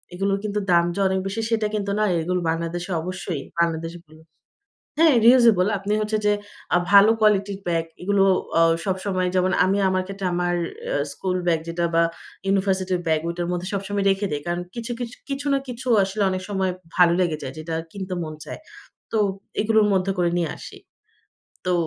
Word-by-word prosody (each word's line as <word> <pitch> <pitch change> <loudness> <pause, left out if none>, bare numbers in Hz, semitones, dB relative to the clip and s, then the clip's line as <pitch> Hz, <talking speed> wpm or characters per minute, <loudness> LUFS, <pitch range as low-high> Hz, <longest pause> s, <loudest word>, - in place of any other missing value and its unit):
এগুলোর 195 +1 0
কিন্তু 210 0 -1
দাম 170 0 +5
যে, - - -3
অনেক 190 0 0
বেশি, 205 +4 -3
সেটা 220 -2 +1
কিন্তু 200 -1 -2
না। - - +3 0.2
এগুলো 180 +2 0
বাংলাদেশে 170 +2 -3
অবশ্যই 180 -3 -4 0.2
বাংলাদেশে 165 0 -1 1.0
হ্যাঁ, 320 -3 +6
রিউজেবল। 235 -7 +6
আপনি 200 +2 -3
হচ্ছে 215 0 -1
যে, 210 - +5 0.4
আ - - +5
ভালো 200 +2 +8
কোয়ালিটির 200 -2 +2
ব্যাগ, 165 -1 +1 0.2
এগুলো 195 +1 +3 0.4
অ - - +6 0.2
সবসময় 185 -1 -1
যেমন, 185 +1 +2
আমি 195 +2 +1
আমার 185 0 +1
ক্ষেত্রে 195 0 -5
অ্যা 180 - 0
আমার 175 0 0 0.6
স্কুল 185 +5 -2
ব্যাগ 165 -2 +2
যেটা 170 +1 -1
বা 165 - +5 0.4
ইউনিভার্সিটির 190 -2 +1
ব্যাগ, 160 -1 +2
ঐ - - 0
টার 175 0 -2
মধ্যে 180 +1 -3
সবসময় 200 0 -2
রেখে 195 +1 0
দেই। 145 -1 -2
কারণ 175 0 -1
কিছু, 235 0 -5
কিছু, 240 0 -5
কিছু 275 +1 -3
না 275 - +3
কিছু 250 +1 -6 0.2
আসলে 195 +2 -2
অনেক 185 0 -3
সময় 190 -2 0 0.3
ভালো 175 -2 +6
লেগে 170 -4 +1
যায়, 135 -1 -6
যেটা 160 +1 -5 0.2
কিনতে 190 -2 -5
মন 155 -1 -6
চায়। - - -8 0.5
তো 225 - +1 0.4
এগুলোর 220 0 +3
মধ্যে 190 +1 +1
করে 175 -1 +2
নিয়ে 165 -3 -1
আসি। - - -10 0.9
তো 180 - +2
190 Hz, 180 wpm, -23 LUFS, 175-205 Hz, 1.0 s, ভালো